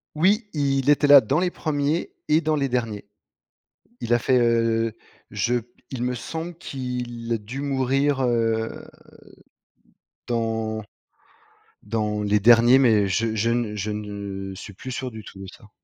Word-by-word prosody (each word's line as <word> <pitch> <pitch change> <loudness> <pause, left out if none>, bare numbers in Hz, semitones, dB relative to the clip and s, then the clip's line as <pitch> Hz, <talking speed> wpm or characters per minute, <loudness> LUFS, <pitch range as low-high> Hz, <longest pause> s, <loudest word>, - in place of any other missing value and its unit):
Oui, 200 +8 +2
il 140 -2 +1
était 145 0 +4
là 145 -2 +9
dans 135 +7 0
les 180 0 +1
1ers 155 -1 -1 0.2
et 155 +2 +3
dans 155 0 +1
les 140 -2 0
derniers. 115 -5 -3 0.9
Il 120 0 -1
a 120 - +4
fait 130 +2 +2
heu, 115 -1 +2 0.4
je 120 - 0
p 115 - -16 0.2
il 130 -3 -5
me 125 0 -1
semble 165 +7 -6
qu'il 125 -6 -5
a - - +1
dû 115 +6 -7
mourir, 135 0 +1
heu, 115 -2 0 1.4
dans 110 -2 -2 1.0
dans 105 -1 -2
les 105 0 +2
derniers 120 +4 +6
mais 110 -6 +4
je 110 +4 0
je 110 +2 +1
ne 115 -3 -1
je 105 +1 -3
ne 100 -2 -6
suis 100 +2 -9
plus 130 +7 -8
sûr 130 0 -4
du 110 -1 -9
tout 95 - -12
de 95 - -8
ça. 105 +2 -15
120 Hz, 160 wpm, -24 LUFS, 110-135 Hz, 1.4 s, là